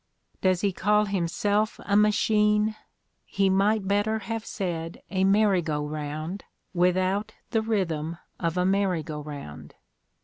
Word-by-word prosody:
Does 185 Hz, -1 st, +2 dB
he 200 Hz, -2 st, +1 dB
call 210 Hz, +3 st, +2 dB
himself 205 Hz, +3 st, 0 dB
a 200 Hz, -, +1 dB
machine? 210 Hz, 0 st, +3 dB, 0.5 s
He 195 Hz, -1 st, +1 dB
might 200 Hz, +1 st, +2 dB
better 205 Hz, +2 st, +1 dB
have 225 Hz, 0 st, -4 dB
said 170 Hz, -4 st, -4 dB
a 190 Hz, -1 st, +1 dB
merry 195 Hz, -1 st, +4 dB
go 150 Hz, -2 st, -2 dB
round, 155 Hz, +5 st, -5 dB, 0.3 s
without 185 Hz, +3 st, +1 dB, 0.2 s
the 225 Hz, -2 st, +2 dB
rhythm 170 Hz, -7 st, -1 dB, 0.2 s
of 165 Hz, 0 st, -1 dB
a 180 Hz, -, +2 dB
merry 190 Hz, -4 st, +1 dB
go 150 Hz, -1 st, -6 dB
round. 80 Hz, -, -9 dB
190 Hz, 135 wpm, -26 LUFS, 165-210 Hz, 0.5 s, merry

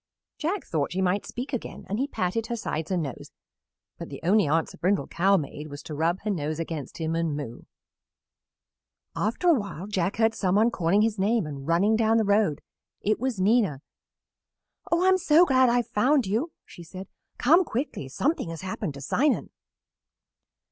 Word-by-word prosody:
Jack 350 Hz, +5 st, -2 dB
thought 150 Hz, -3 st, -1 dB
she 185 Hz, -, -2 dB
might 190 Hz, +2 st, 0 dB
speak 260 Hz, +4 st, -6 dB
again 250 Hz, -, -5 dB
and 205 Hz, +3 st, -2 dB
he 275 Hz, -, 0 dB
patted 220 Hz, -1 st, -2 dB
her 240 Hz, -, -2 dB
sides 160 Hz, -8 st, -4 dB
and 180 Hz, -3 st, 0 dB
nose, 135 Hz, -4 st, -7 dB, 0.7 s
but -, -, -7 dB
the -, -, -7 dB
only 200 Hz, +1 st, +3 dB
answer 160 Hz, +3 st, 0 dB
Brindle 190 Hz, +3 st, +1 dB
Cow 195 Hz, +3 st, +2 dB
made 150 Hz, -1 st, -5 dB
was 145 Hz, -1 st, -9 dB
to 155 Hz, -, -7 dB
rub 165 Hz, +5 st, 0 dB
her 210 Hz, -, -2 dB
nose 155 Hz, -3 st, -2 dB
against 160 Hz, -5 st, -5 dB
him 160 Hz, 0 st, -2 dB
and 165 Hz, -3 st, -1 dB
moo. 130 Hz, -5 st, -7 dB, 1.5 s
After 230 Hz, -, -1 dB
a -, -, +7 dB
while 200 Hz, -, -3 dB
Jack 195 Hz, -2 st, -1 dB
heard 225 Hz, 0 st, +3 dB
some 185 Hz, -3 st, 0 dB
one 225 Hz, +3 st, +4 dB
calling 190 Hz, +2 st, +2 dB
his 220 Hz, -2 st, 0 dB
name 210 Hz, 0 st, +2 dB
and 140 Hz, -2 st, -7 dB
running 190 Hz, +6 st, +3 dB
down 225 Hz, 0 st, +3 dB
the 220 Hz, -, +2 dB
road. 200 Hz, -7 st, +2 dB, 0.4 s
It 215 Hz, +1 st, +1 dB
was 255 Hz, -4 st, -2 dB
Nina. 195 Hz, -, +2 dB, 1.1 s
"Oh, 340 Hz, +2 st, +3 dB
I -, -, +4 dB
am 375 Hz, 0 st, +5 dB
so 330 Hz, 0 st, +5 dB
glad 260 Hz, -4 st, +4 dB
I 235 Hz, -, +2 dB
have 245 Hz, -2 st, +1 dB
found 260 Hz, +4 st, +2 dB
you!" 230 Hz, -, -1 dB
she -, -, -13 dB
said. 185 Hz, +3 st, -9 dB, 0.3 s
"Come 330 Hz, +9 st, +5 dB
quickly; 245 Hz, -, -4 dB
something 275 Hz, -, -1 dB
has 165 Hz, -1 st, -6 dB
happened 185 Hz, -4 st, -4 dB
to 140 Hz, -, -9 dB
Simon." 265 Hz, -, +1 dB
200 Hz, 190 wpm, -26 LUFS, 165-235 Hz, 1.5 s, a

